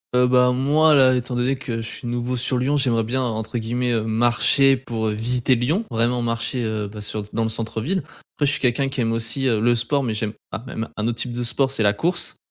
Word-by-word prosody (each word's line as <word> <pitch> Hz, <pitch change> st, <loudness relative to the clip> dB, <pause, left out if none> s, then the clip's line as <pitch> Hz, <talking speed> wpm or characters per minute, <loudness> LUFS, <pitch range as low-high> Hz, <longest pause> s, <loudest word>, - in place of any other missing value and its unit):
Heu, 125 Hz, 0 st, +4 dB
ben, 125 Hz, 0 st, +4 dB
moi, 150 Hz, +4 st, +3 dB
là, 130 Hz, -2 st, +5 dB
étant 125 Hz, 0 st, -3 dB
donné 125 Hz, +3 st, +1 dB
que 120 Hz, -3 st, -5 dB
je -, -, -6 dB
suis 120 Hz, -, -7 dB
nouveau 120 Hz, +1 st, -2 dB
sur 125 Hz, +1 st, 0 dB
Lyon, 135 Hz, +4 st, +1 dB
j'aimerais 120 Hz, -5 st, +1 dB
bien, 125 Hz, +4 st, -1 dB
entre 110 Hz, -1 st, -3 dB
guillemets, 120 Hz, +2 st, -1 dB
heu, 115 Hz, -, +1 dB
«marcher 120 Hz, +4 st, +3 dB
pour 115 Hz, -4 st, -4 dB
visiter 120 Hz, +4 st, +1 dB
Lyon,» 155 Hz, -, 0 dB
vraiment 120 Hz, +2 st, 0 dB
marcher, 115 Hz, +2 st, -2 dB
heu, 110 Hz, -2 st, -2 dB
bah, 105 Hz, +1 st, -9 dB
sur 105 Hz, +1 st, -3 dB
dans 115 Hz, -, -1 dB
le 110 Hz, -, 0 dB
centre-ville. 115 Hz, -, -2 dB, 0.3 s
Après 145 Hz, -, +1 dB
je -, -, +4 dB
suis -, -, 0 dB
quelqu'un 135 Hz, +2 st, +1 dB
qui 135 Hz, -1 st, -3 dB
aime 115 Hz, -1 st, 0 dB
aussi, 115 Hz, +4 st, -1 dB
heu, 115 Hz, -4 st, +2 dB
le 120 Hz, +2 st, +3 dB
sport 120 Hz, +5 st, 0 dB
mais 115 Hz, -4 st, -2 dB
j'aime 105 Hz, -1 st, -3 dB, 0.2 s
ah, 110 Hz, -, -5 dB
même 115 Hz, -3 st, -5 dB
un 105 Hz, -, -2 dB
autre 115 Hz, 0 st, -2 dB
type 125 Hz, -, -2 dB
de 120 Hz, 0 st, -3 dB
sport, 130 Hz, +3 st, +1 dB
c'est 135 Hz, -4 st, -1 dB
la 100 Hz, 0 st, +4 dB
course. 175 Hz, -, -1 dB
120 Hz, 245 wpm, -22 LUFS, 115-130 Hz, 0.3 s, là